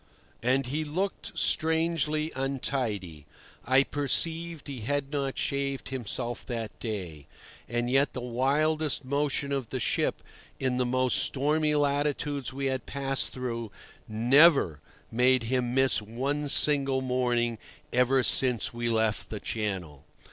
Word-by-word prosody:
And 130 +3 +2
he 145 +5 -2
looked 180 +7 -3
strangely 160 -1 +1
untidy. 120 - -3 0.4
I 130 +3 +4
perceived 160 +4 -1
he 140 -3 -6
had 140 +4 -2
not 140 -2 -2
shaved 140 -1 -2
himself 120 -1 -3
that 115 -4 -5
day; 90 - -5 0.4
and 120 0 -1
yet 135 +3 +2
the 125 - -4
wildest 145 +4 0
motion 140 +1 -1
of 135 -4 -2
the 130 - -3
ship - - 0 0.4
in 130 -2 0
the 125 -1 +1
most 130 0 +2
stormy 150 +2 +1
latitudes 145 -1 0
we 135 +1 -4
had 130 -1 -2
passed 135 -1 -1
through, 115 -4 -4 0.4
never 120 - +4 0.3
made 125 +1 +3
him 125 +1 -1
miss 135 -3 +3
one 135 +7 -3
single 135 -2 +3
morning 120 -3 0 0.3
ever 125 +1 +3
since 125 -4 +2
we 120 0 -2
left 110 -1 0
the 105 - -5
Channel. 95 -12 -4
130 Hz, 130 wpm, -28 LUFS, 120-145 Hz, 0.4 s, I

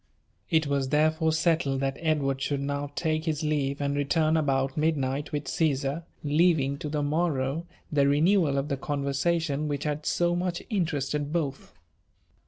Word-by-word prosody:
It 160 -2 +3
was 140 -2 0
therefore 155 +2 +2
settle^ 160 -3 +1
that 135 0 -1
Edward 145 -4 0
should 140 0 -1
now 140 0 -3
take 155 +1 -1
his 155 -2 -1
leave, 145 -2 0
and 140 0 -1
return 155 +2 +2
about 135 -3 +1
midnight 145 -2 0
with 145 -2 -3
Caesar, 145 0 0 0.2
leaving 145 -2 +2
to 150 - -4
the 150 -1 -1
morrow 150 0 0 0.2
the 140 -2 +3
renewal 155 0 +3
of 140 +1 -1
the 140 -2 -2
conversation 145 +2 -1
wbieh 145 0 -2
had 150 0 -3
so 175 0 +2
much 175 -1 -2
interested 150 -6 -1
both. 145 -5 -3
150 Hz, 155 wpm, -27 LUFS, 140-160 Hz, 0.2 s, It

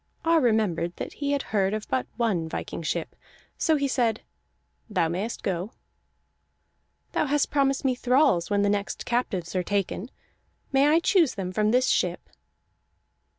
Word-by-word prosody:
Ar 330 -1 +4
remembered 210 - +1
that - - -6
he 285 -1 -2
had 285 -2 0
heard 195 0 +2
of 215 - -5
but 260 - -1
one 195 -9 0
viking - - -5
ship, 165 +1 -3 0.4
so 320 - +2
he 280 -1 +1
said: 235 -4 0 0.7
"Thou 185 -6 +1
mayest 190 +8 -4
go." 190 +4 -2 1.4
"Thou - - 0
hast 290 +1 +1
promised 275 -1 +1
me 260 - +3
thralls 250 - +2
when 205 -1 +2
the - - +3
next 200 0 -2
captives 195 -8 -2
are 185 - +2
taken. 200 +3 -2 0.6
May 275 +1 +4
I 320 +3 +4
choose 340 -6 +3
them 185 -2 -4
from 210 +3 +1
this 250 +3 +3
ship?" - - 0
220 Hz, 155 wpm, -26 LUFS, 190-275 Hz, 1.4 s, Ar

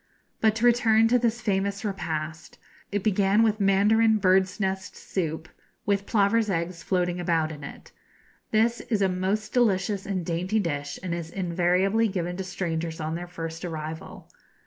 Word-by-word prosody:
But 220 -1 +3
to 225 +2 0
return 225 -2 +5
to 250 +1 +4
this 235 0 0
famous 200 -1 -1
repast. 160 -5 -4 0.3
It 200 -1 -1
began 205 +1 +3
with 215 -1 +2
mandarin 210 +3 +4
bird's 190 0 +2
nest 190 -1 -2
soup, 160 -4 -3 0.4
with 200 -1 0
plover's 215 +1 +2
eggs 170 -1 -2
floating 180 0 0
about 165 -3 +1
in 150 -2 -9
it. 140 - -10 0.6
This 230 +2 +2
is 215 -4 +2
a - - +4
most 190 +4 -2
delicious 200 -5 +1
and 185 -4 -2
dainty 180 +6 0
dish, 145 -6 -3
and 180 -2 -2
is 170 -1 -4
invariably 185 +4 +1
given 175 -3 -3
to 190 - -3
strangers 170 -3 -3
on 155 0 -3
their 175 +1 -5
first 165 -1 -6
arrival. 160 -2 -6
190 Hz, 160 wpm, -26 LUFS, 170-215 Hz, 0.6 s, return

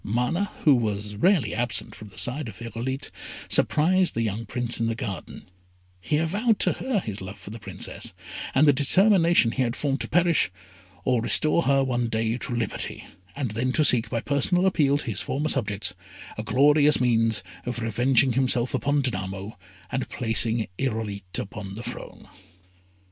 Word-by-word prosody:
Mana, 125 - -1
who 150 - +6
was 105 -4 -1
rarely 175 - +2
absent 120 +1 -1
from 110 - -10
the 100 - -16
side 135 +2 0
of 110 - -9
Irolite, 120 +3 -5 0.4
surprised 180 +4 +3
the 115 - 0
young 110 +1 -3
Prince 120 +1 -2
in 115 - 0
the 115 - -1
garden; 105 -5 -6 0.5
he 150 +11 0
avowed 205 +8 +1
to - - +2
her 255 -6 -1
his 105 - -6
love 95 +1 -7
for 100 - -9
the 115 - -8
Princess, - - -4 0.4
and 150 +3 +5
the 145 - +7
determination 170 - +4
he 130 - -2
had 120 -1 0
formed 140 -2 -1
to - - -2
perish, 175 -7 +3 0.6
or 125 -2 +2
to - - -4
restore 155 +2 +3
her 135 -2 +2
one 120 -2 -1
day 115 0 -1
to 125 -2 -4
liberty, 115 -3 -4 0.3
and 135 -6 -3
then 120 +4 -1
to 155 - +3
seek, 115 -5 +4
by 115 - -2
a - - -1
personal 165 +6 +2
appeal 150 -7 +3
to - - -5
his 110 -6 -1
former 150 +3 -2
subjects, 105 -6 +1 0.4
a - - -4
glorious 145 +6 +4
means 115 -4 +2 0.2
of 125 - -2
revenging 120 +3 +2
himself 130 -1 +1
on 145 0 +1
Danamo, 95 -3 -4 0.4
and - - -1
of - - -6
placing 115 -1 0
Irolite 105 -7 -3
upon 100 -1 -6
the 115 - -6
throne. - - -8
125 Hz, 180 wpm, -25 LUFS, 110-145 Hz, 0.6 s, the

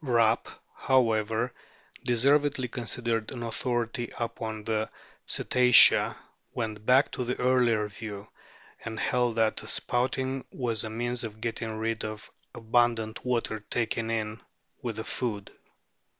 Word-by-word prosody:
Rapp, 115 -4 +2 0.3
however, 115 -2 +1 0.5
deservedly 135 +2 +2
considered 115 -2 -2
an 120 -2 -5
authority 120 0 -2
upon 115 -2 -4
the 110 0 -1 0.4
Cetacea, 125 -1 +6 0.4
went 110 -2 -3
back 130 +3 +5
to 125 - -3
the 125 +1 -3
earlier 125 -4 +3
view, 105 -1 -8 0.6
and 110 0 -5
held 125 -2 +1
that 110 -1 +2
the - - -5
spouting 130 +2 -1
was 120 -4 -2
a 110 - -3
means 120 +2 -2
of 110 -1 -6
getting 115 -1 -3
rid 115 +1 -2
of 110 0 -7 0.2
the - - -13
abundant 115 -1 +1
water 120 -3 -1
taken 115 -1 -1
in 110 -1 -2 0.4
with 120 -4 -3
the 110 - -4
food. 105 -6 -3
115 Hz, 130 wpm, -28 LUFS, 110-125 Hz, 0.6 s, Cetacea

